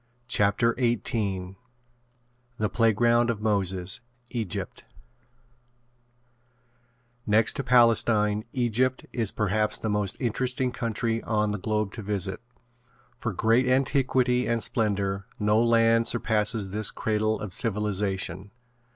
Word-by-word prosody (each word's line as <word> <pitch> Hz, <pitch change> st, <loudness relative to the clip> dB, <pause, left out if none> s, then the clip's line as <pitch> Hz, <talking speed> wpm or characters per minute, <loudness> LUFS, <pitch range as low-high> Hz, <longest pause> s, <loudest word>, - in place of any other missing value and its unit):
CHAPTER 115 Hz, +1 st, +2 dB
XVIII 100 Hz, -6 st, -1 dB, 1.0 s
THE 105 Hz, -1 st, -1 dB
PLAYGROUND 120 Hz, +1 st, +2 dB
OF 115 Hz, -3 st, -1 dB
MOSES 100 Hz, 0 st, 0 dB, 0.3 s
EGYPT 110 Hz, -8 st, -5 dB, 2.4 s
Next 110 Hz, +1 st, +3 dB
to 140 Hz, -, -3 dB
Palestine, 115 Hz, -4 st, +4 dB
Egypt 125 Hz, +1 st, 0 dB
is 115 Hz, -5 st, -1 dB
perhaps 105 Hz, +1 st, -1 dB
the 110 Hz, -, -3 dB
most 105 Hz, -2 st, -1 dB
interesting 125 Hz, +1 st, -1 dB
country 115 Hz, -1 st, -2 dB
on 105 Hz, -2 st, 0 dB
the 105 Hz, -, -3 dB
globe 105 Hz, 0 st, -1 dB
to 115 Hz, -, -7 dB
visit. 100 Hz, -1 st, -1 dB, 0.8 s
For 115 Hz, -, -2 dB
great 115 Hz, +6 st, +2 dB
antiquity 130 Hz, -1 st, +1 dB
and 115 Hz, -2 st, 0 dB
splendor 100 Hz, -4 st, -1 dB
no 105 Hz, +1 st, +2 dB
land 115 Hz, 0 st, +3 dB
surpasses 110 Hz, -3 st, 0 dB
this 105 Hz, +1 st, +1 dB
cradle 110 Hz, 0 st, -1 dB
of 105 Hz, -3 st, -5 dB
civilization. 100 Hz, -3 st, -1 dB
110 Hz, 110 wpm, -26 LUFS, 105-120 Hz, 2.4 s, Palestine